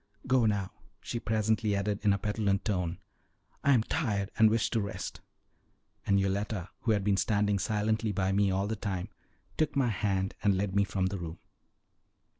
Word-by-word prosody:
"Go 125 -3 +3
now," 100 -3 0 0.3
she 120 - -4
presently 110 -1 +1
added 100 +1 -1
in 105 - +4
a 100 - +2
petulant 100 -1 0
tone; 90 -4 -1 0.7
"I 140 - +4
am 115 -4 +4
tired, 105 -10 -1
and 110 0 +6
wish 110 0 +1
to 115 - +1
rest"; 100 - -5 0.9
and 100 0 +4
Yoletta, 100 -1 -1
who 110 - +1
had 100 -2 0
been 100 -1 +2
standing 105 -1 +1
silently 110 +2 0
by 95 -1 0
me 100 0 +3
all 95 +1 0
the 110 +2 -2
time, 95 -4 -3 0.5
took 155 -2 +1
my 135 -3 +2
hand 95 -2 0
and 100 -2 +3
led 95 0 -1
me 100 0 +4
from 95 -1 -1
the 95 +1 -2
room. 85 -1 -6
100 Hz, 180 wpm, -30 LUFS, 95-110 Hz, 0.9 s, and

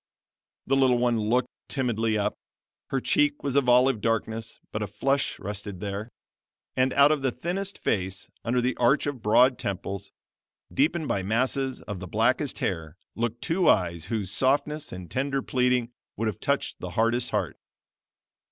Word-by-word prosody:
The 135 - +2
little 130 -2 +4
one 120 -1 +2
looked 120 +4 +1 0.2
timidly 115 -5 0
up. 105 0 0 0.5
Her 135 - 0
cheek 145 +3 +2
was 140 -2 -1
of 140 -3 +3
olive 125 -2 +4
darkness, 115 0 -2
but 105 - -3
a 105 - -1
flush 135 +8 0
rested 100 -2 -6
there, 100 +3 -4 0.7
and 130 +1 +2
out 140 +1 +6
of 150 -2 +1
the 135 -1 +1
thinnest 185 +10 -3
face, 95 -1 -2 0.2
under 125 +2 +1
the 125 0 0
arch 125 +4 +3
of 145 -5 -3
broad 120 +4 +4
temples, 100 -1 -4 0.6
deepened 155 - +1
by 100 - 0
masses 130 +6 0
of 105 -3 -6
the 95 - -7
blackest - - +1
hair 80 -2 -3 0.2
looked 120 0 -3
two 175 +2 +2
eyes 85 -4 +2
whose 100 -2 -2
softness 145 +5 +1
and 90 -2 -8
tender 135 0 -1
pleading 125 -2 +1 0.3
would 115 - 0
have 105 - -3
touched - - -1
the - - -5
hardest 115 +2 +2
heart. - - -2
120 Hz, 160 wpm, -26 LUFS, 105-135 Hz, 0.7 s, out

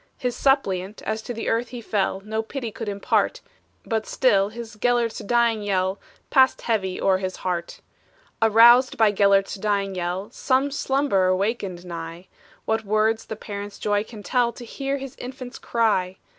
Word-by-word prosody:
His 250 -1 -2
suppliant, 205 -8 0
as 220 0 -2
to 230 0 -5
earth 230 +2 +1
he 245 +1 -8
fell, 200 -3 -1
No 220 +2 -2
pity 235 +1 -5
could 225 0 -5
impart; 200 0 0 0.4
But 220 -2 -2
still 200 -6 +3
his 225 0 -9
Gelert's 240 0 +1
dying 235 0 +1
yell 190 -1 0 0.3
Passed 260 -1 +4
heavy 195 -5 -1
o'er 190 -1 +2
his 185 -1 -3
heart. 175 -2 -4 0.6
Aroused 235 +3 +6
by 220 -2 +5
Gelert's 200 -1 +3
dying 200 -1 -1
yell, 185 +4 -3
Some 265 +2 +1
slumberer 265 -10 +1
wakened 195 -3 -2
nigh; 170 +1 -7 0.4
What 220 0 0
words 215 +2 +1
the 220 - -5
parent's 205 -1 -7
joy 205 0 0
can 220 -2 -11
tell, 245 0 +1
To 240 - -10
hear 275 +4 -3
his 270 -2 -8
infant 255 0 -8
cry! 200 -6 +1
220 Hz, 155 wpm, -24 LUFS, 195-240 Hz, 0.6 s, Aroused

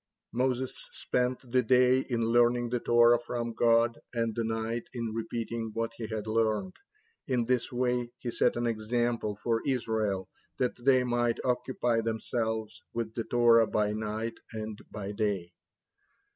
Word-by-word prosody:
Moses 130 +1 0 0.2
spent 125 0 -1
the 130 0 +4
day 125 +1 +4
in 120 -3 -1
learning 120 +1 +3
the 125 0 0
Torah 120 0 +5
from 120 -1 -4
God, 115 0 +3 0.2
and 115 -1 0
the 115 - -1
night 115 +1 -2
in 115 -3 -3
repeating 115 0 -3
what 115 0 -1
he 115 - -4
had 110 -1 -4
learned. 110 -3 0 0.5
In 125 -3 +1
this 125 -1 0
way 125 -1 0
he 120 - -4
set - - +2
an 120 0 -1
example 115 -1 -1
for 115 +2 -1
Israel, 110 -7 -1 0.3
that 125 -1 +1
they 130 -1 +5
might 120 -1 +1
occupy 125 -2 +1
themselves 110 -1 -2
with 115 -1 -2
the 115 -1 -3
Torah 115 -2 +5
by 105 -1 +1
night 110 +2 -3
and 110 -1 -5
by 100 -1 -5
day. 100 -4 -1
115 Hz, 150 wpm, -29 LUFS, 110-120 Hz, 0.5 s, Torah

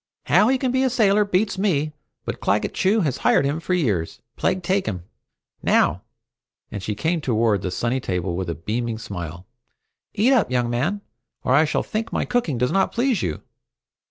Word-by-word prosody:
How 215 - +4
he 265 +1 +3
can 255 -1 -1
be 260 +1 +1
a 265 - +3
sailor 210 -4 +3
beats 200 0 0
me, 155 -7 +1 0.3
but - - -4
Claggett 100 +2 0
Chew 205 +4 +2
has 140 -7 0
hired - - +3
him 145 +3 -1
for 180 +2 -1
years, 105 - -1 0.2
plague 185 - 0
take 190 +2 0
him! 90 -5 -3 0.6
Now," 90 +5 +2 0.7
and 100 - -5
she 105 +2 -3
came 160 +7 0
toward 110 -6 +1
the 95 - -2
sunny 120 +7 -1
table 90 -5 -2
with 90 -1 -3
a 85 - -2
beaming 110 +8 -3
smile, 90 -6 -7 0.7
"eat 235 +7 +4
up, 245 -6 +3
young 125 -2 0
man, 165 +13 -1 0.4
or 125 - +2
I 150 +4 +5
shall 150 - 0
think 220 +1 -3
my - - -1
cooking 230 - 0
does 125 +2 +1
not 195 0 +2
please 240 -3 +1
you!" 80 -3 -3
140 Hz, 190 wpm, -23 LUFS, -, 0.7 s, I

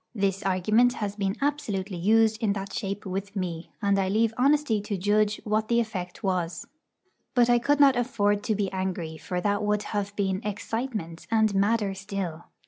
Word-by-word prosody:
This 195 -2 0
argument 215 +6 +3
has 205 -4 -3
been 195 -1 -1
absolutely 210 -10 -1
used 220 +3 +3
in 210 -3 +2
that 195 -1 -5
shape 200 +1 -4
with 195 +2 -4
me; 175 -3 -4
and 200 -1 +3
I 190 -1 +1
leave 220 +2 +2
honesty 275 -4 +2
to 205 -1 -3
judge 210 +2 +2
what 215 0 0
the 235 0 +3
effect 190 -6 -4
was. 180 -3 -1 0.7
But 245 -1 +5
I 240 - +5
could 285 +4 +2
not 275 -2 +7
afford 205 -4 +1
to 215 - +1
be 200 -2 -1
angry, 185 -4 -3
for 180 +2 -3
that 205 +2 +1
would 210 0 0
have 205 -1 -2
been 195 -1 0
'excitement' 210 -5 -4
and 220 -2 +3
madder 200 +1 +2
still. 190 -4 -5
205 Hz, 180 wpm, -27 LUFS, 190-225 Hz, 0.7 s, not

